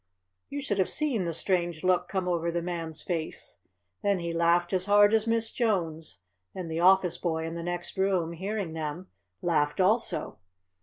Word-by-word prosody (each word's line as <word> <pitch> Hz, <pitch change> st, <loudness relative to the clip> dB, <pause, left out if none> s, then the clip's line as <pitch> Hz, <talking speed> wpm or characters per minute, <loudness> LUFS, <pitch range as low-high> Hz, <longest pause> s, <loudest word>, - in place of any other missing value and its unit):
You 285 Hz, 0 st, -4 dB
should 205 Hz, -8 st, -2 dB
have 190 Hz, -, +2 dB
seen 270 Hz, -, 0 dB
the 170 Hz, -, -1 dB
strange 175 Hz, -1 st, 0 dB
look 180 Hz, -1 st, +2 dB
come 190 Hz, -2 st, -2 dB
over 170 Hz, -1 st, 0 dB
the 170 Hz, 0 st, -2 dB
Man's 165 Hz, -3 st, -4 dB
face. 165 Hz, -3 st, -4 dB, 0.4 s
Then 200 Hz, -1 st, +2 dB
he 170 Hz, -1 st, -3 dB
laughed 170 Hz, +2 st, +2 dB
as 185 Hz, +1 st, +1 dB
hard 205 Hz, +1 st, +6 dB
as 220 Hz, 0 st, +2 dB
Miss 225 Hz, 0 st, +1 dB
Jones, 165 Hz, -, -1 dB, 0.4 s
and 180 Hz, -3 st, -5 dB
the 160 Hz, -, -2 dB
office 185 Hz, 0 st, +4 dB
boy 160 Hz, -2 st, -1 dB
in 165 Hz, -, -4 dB
the 170 Hz, -, -5 dB
next 175 Hz, +2 st, -4 dB
room, 185 Hz, -4 st, +1 dB
hearing 190 Hz, 0 st, -3 dB
them, 160 Hz, +3 st, -5 dB, 0.3 s
laughed 150 Hz, -3 st, +1 dB
also. 215 Hz, +5 st, +1 dB
175 Hz, 175 wpm, -28 LUFS, 165-195 Hz, 0.4 s, hard